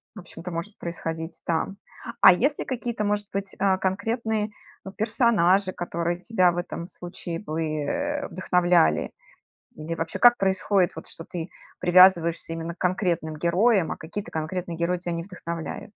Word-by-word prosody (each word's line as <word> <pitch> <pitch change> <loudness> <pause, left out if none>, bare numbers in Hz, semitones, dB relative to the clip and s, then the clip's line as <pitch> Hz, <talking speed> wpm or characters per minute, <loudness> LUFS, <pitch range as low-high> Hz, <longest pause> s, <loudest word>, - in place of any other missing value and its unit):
в - - -8
общем-то, 175 +1 -9
может 170 +5 -5
происходить 165 -1 -5
там. 170 +4 -1 0.4
А 185 - +10
есть 280 +10 +1
ли - - -3
какие-то, 235 -4 -3
может 205 0 0
быть, 195 0 -4
а, 195 -1 +3
конкретные, 220 +3 -1 0.5
персонажи, 205 -4 +3
которые 170 0 -2
тебя 185 -5 +3
в 175 - -6
этом 175 -1 -4
случае 175 -2 -6
бы, 160 -5 -4
э, 285 - -2
вдохновляли? 175 - +2 0.7
Или 155 +2 -4
вообще, 165 0 -4
как 240 0 +7
происходит 190 -1 +2
вот, - - -7
что 165 - -8
ты 170 0 -6 0.3
привязываешься 175 -2 +5
именно 165 +1 -4
к - - -36
конкретным 175 -4 0
героям, 180 +3 +2
а - - -4
какие-то 185 +6 -7
конкретные 165 +2 -4
герои 170 +1 0
тя 175 0 -4
не 170 0 -3
вдохновляют? 170 -4 -6
180 Hz, 155 wpm, -25 LUFS, 170-200 Hz, 0.7 s, А